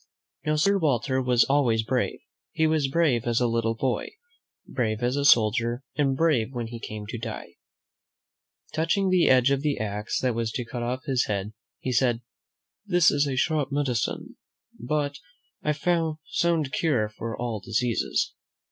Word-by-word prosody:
Now, 155 - +2
Sir 195 +6 +3
Walter 130 - +1
was 125 -2 +4
always 130 -6 +2
brave. 125 +2 -1 0.4
He 160 - +2
was 155 -3 +2
brave 135 -5 +1
as 120 -1 +1
a 125 - +2
little 115 -1 0
boy, 125 +2 -1 0.6
brave 110 -2 -2
as 125 +2 +1
a 140 - 0
soldier, 120 0 +3
and 135 -3 +1
brave 135 -7 +2
when 120 -1 -2
he 115 +1 -7
came 105 -2 -7
to 115 +2 -6
die. 115 -1 -7 1.2
Touching 165 +5 +1
the 180 -2 +4
edge 130 +1 +5
of 140 -1 +1
the 145 -1 0
axe 105 0 -2
that 125 -2 +1
was 115 -1 -2
to 125 - -3
cut 120 +1 -5
off 125 +2 -3
his 130 -3 +1
head, 100 +1 -3 0.2
he 130 - -3
said, 120 -1 +1 0.6
"This 175 -5 +4
is 145 0 +1
a 135 - -2
sharp 145 0 0
medicine, 135 -5 -2 0.4
but 145 +3 -2 0.4
a 150 0 0 0.5
sound 165 -5 0
cure 125 -10 +1
for 110 +1 -6
all 120 -3 -2
diseases." 110 +5 -1
125 Hz, 165 wpm, -26 LUFS, 115-145 Hz, 1.2 s, edge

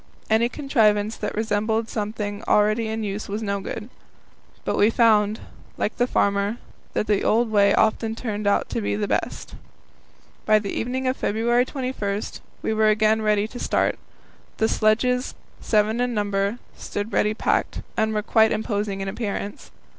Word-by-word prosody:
Any 230 +2 +4
contrivance 220 -7 +2
that 210 - -4
resembled 220 +1 0
something 210 -1 -4
already 215 +2 +3
in 220 0 -3
use 205 0 -4
was 210 +2 -3
no 200 -1 -1
good. 210 +2 -6 0.8
But - - 0
we 205 - +4
found, 220 -2 +3 0.4
like 210 - -2
the 245 - +2
farmer, 200 0 +1 0.4
that - - 0
the 210 -2 +1
old 230 +1 +2
way 200 -1 +4
often 220 0 +1
turned 215 -3 -3
out 200 - +2
to 230 - -2
be 205 - -1
the 205 0 -1
best. - - -2 0.9
By 215 0 +5
the 205 -2 -3
evening 255 +3 -2
of 255 - 0
February 235 +3 +1
21 250 -7 -3 0.4
we 220 - 0
were 215 0 +3
again 215 +1 +3
ready 210 -1 +2
to 245 - -8
start. - - 0 0.6
The 220 - +2
sledges 250 +4 +1 0.2
seven 215 +2 +1
in 245 -1 0
number 205 +1 0 0.2
stood 205 +2 -5
ready 210 +1 +2
packed, - - 0
and 220 -1 +1
were 210 -1 -1
quite 220 +1 +4
imposing 205 -2 -2
in 195 - -3
appearance. 200 0 -4
215 Hz, 160 wpm, -23 LUFS, 205-225 Hz, 0.9 s, By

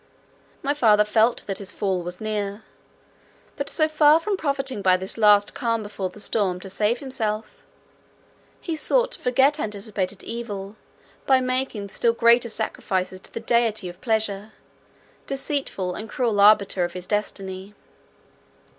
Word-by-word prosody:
My 285 +1 +1
father 215 -7 +4
felt 220 +3 +2
that 195 -2 -3
his 200 -1 -7
fall 190 -3 -1
was 175 +1 -7
near; 210 -1 -3 0.9
but 280 -1 -3
so 310 - +2
far 310 0 +5
from 405 +4 -1
profiting 275 - -2
by 185 -1 +4
this 190 +1 -4
last 210 -2 +4
calm 230 -4 -1
before 205 -2 -4
the 195 - -14
storm 195 -4 -1
to 195 - -8
save 210 +4 +1
himself, 220 -5 -3 1.0
he 330 - -4
sought - - +2
to - - -6
forget 270 +4 +2
anticipated 205 -3 -4
evil 210 -4 -6 0.5
by 265 -1 +5
making 255 -5 -2
still 230 +3 +1
greater 235 +1 +4
sacrifices 190 -4 -2
to - - -12
the - - -5
deity 225 -4 +1
of 175 +1 -13
pleasure, 215 -2 -1 0.7
deceitful 270 -9 -2
and 215 +4 -7
cruel 230 -5 0
arbiter 200 -2 +5
of 175 0 -3
his 180 -1 -6
destiny. 195 -1 -4
215 Hz, 145 wpm, -24 LUFS, 200-255 Hz, 1.0 s, far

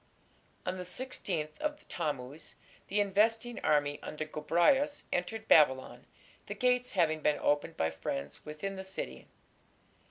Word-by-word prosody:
On 185 +1 -2
the - - -3
16th 180 -6 -3
of 300 0 -3
Tammuz 145 -3 -4 0.3
the 205 - +1
investing 225 +4 +2
army 145 -1 +2
under 155 0 -4
Gobryas 175 - +2
entered 220 +5 -2
Babylon, 130 -4 +4 0.4
the - - -4
gates 250 -1 +2
having 160 -5 +2
been 150 0 +3
opened 145 +3 0
by 80 - +1
friends 70 -3 -5
within 190 +6 -5
the 190 - -5
city. 65 - -6
175 Hz, 130 wpm, -32 LUFS, 150-220 Hz, 0.4 s, Babylon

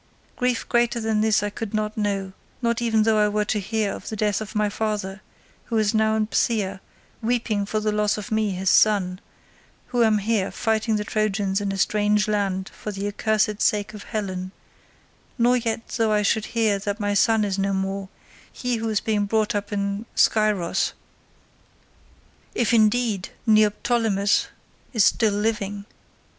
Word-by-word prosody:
Grief 250 -2 -1
greater 240 0 +2
than 220 -1 0
this 215 -1 +2
I 205 - -2
could 220 0 -5
not 215 0 -1
know, 200 -3 -2 0.3
not 235 -1 0
even 225 -2 +2
though 220 -1 +3
I 210 - +4
were 210 0 0
to 210 0 0
hear 215 +1 -1
of - - -8
the 220 - -4
death 210 0 0
of 215 - -7
my 210 0 +2
father, 205 -2 -3 0.4
who 230 - -2
is 215 -2 +2
now 220 0 +2
in 220 -1 +1
Phthia 205 -3 0 0.4
weeping 225 -3 0
for 215 - -1
the 215 0 0
loss 210 0 +1
of 210 0 -7
me 220 -1 +1
his 190 -1 0
son, 190 -4 +3 0.7
who 245 -1 +1
am 220 -1 +4
here 205 -1 0
fighting 220 0 0
the 210 - -1
Trojans 205 -2 0
in 200 -1 -1
a 195 - -3
strange 210 +1 +2
land 195 -3 -1
for 210 - -6
the 200 0 -5
accursed 210 0 0
sake 210 0 +1
of 210 - -9
Helen, 185 -4 -4 0.9
nor 245 +1 +4
yet 230 -1 -3
though 225 -2 0
I 210 0 +2
should 215 +1 +1
hear 215 -3 +2
that 205 +2 -3
my 205 -1 0
son 220 +1 +3
is 195 -1 -2
no 195 0 +1
more—he 195 +5 -4
who 225 0 -2
is 215 -2 0
being 210 -2 0
brought 215 0 +1
up 205 0 -3
in 200 +2 -2
Scyros—if 210 -6 +2 1.8
indeed 220 -3 +2 0.2
Neoptolemus 215 -1 +2 0.5
is 220 -5 +4
still 220 -3 +3
living. 205 -1 -2
210 Hz, 170 wpm, -23 LUFS, 200-220 Hz, 1.8 s, I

